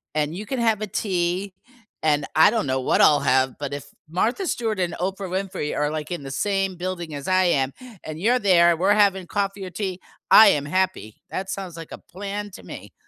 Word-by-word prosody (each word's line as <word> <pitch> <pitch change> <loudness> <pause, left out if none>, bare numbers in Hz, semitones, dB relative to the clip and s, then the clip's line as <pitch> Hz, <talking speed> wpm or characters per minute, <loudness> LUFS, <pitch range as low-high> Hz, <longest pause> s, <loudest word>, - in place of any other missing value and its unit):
and 155 +1 -1
you 205 +4 -6
can 265 +3 -3
have 225 -3 +1
a 215 - -2
tea, 185 -1 -2 0.5
and 150 -2 +2
I 160 - +7
don't 225 -6 -1
know 130 0 0
what - - +2
I'll 145 -1 +6
have, 130 -1 +2
but 145 -1 -4
if 145 - -6 0.2
Martha 230 - 0
Stewart 220 - -2
and 180 -2 -1
Oprah 190 +1 -3
Winfrey 185 -4 -3
are, 150 0 0
like, 155 -1 -4
in 175 -5 -4
the 135 - -7
same 195 +5 -1
building 175 -3 -5
as 140 - -7
I 185 0 +3
am, 135 -6 +1 0.3
and 155 0 -7
you're 240 +7 +2
there, 175 -5 +4
we're 190 +4 +3
having 195 -3 +2
coffee 200 0 -2
or - - -6
tea, 190 -1 -4 0.3
I 220 - +10
am 145 -6 +1
happy, 180 - -1
that 190 0 -4
sounds 190 -3 -5
like 165 -1 -9
a - - -7
plan 205 +2 -7
to 190 - -12
me. - - -10
185 Hz, 215 wpm, -23 LUFS, 155-200 Hz, 0.5 s, I